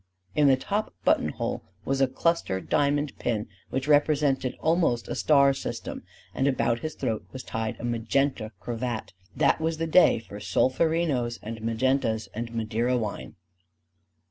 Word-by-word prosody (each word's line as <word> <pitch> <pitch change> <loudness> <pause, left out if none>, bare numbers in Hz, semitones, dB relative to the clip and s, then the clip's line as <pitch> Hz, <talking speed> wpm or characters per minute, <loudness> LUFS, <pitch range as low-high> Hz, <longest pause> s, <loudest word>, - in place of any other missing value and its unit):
In 150 -1 +4
the 135 -1 +5
top 205 +10 -2
button - - +3
hole - - -3 0.2
was 135 0 0
a 135 - +5
cluster 130 - 0
diamond 145 +4 0
pin 110 -2 -1 0.2
which 135 +1 -2
represented 145 -3 +2
almost 160 -8 +1
a - - -3
star 140 -2 +4
system; - - -5 0.3
and 135 - +1
about 120 -3 +1
his 155 +2 -5
throat 110 -2 -2
was 130 - -7
tied 110 -1 -3
a - - -8
magenta 120 0 0
cravat: 120 -1 -4 0.2
that - - +3
was 160 0 0
the 165 - -1
day 170 +3 +5
for 105 -2 -9
solferinos 130 - +1
and 115 +1 -6
magentas 115 0 0
and 115 +1 -4
Madeira 115 +2 0
wine. 105 - -4
130 Hz, 150 wpm, -27 LUFS, 115-145 Hz, 0.3 s, the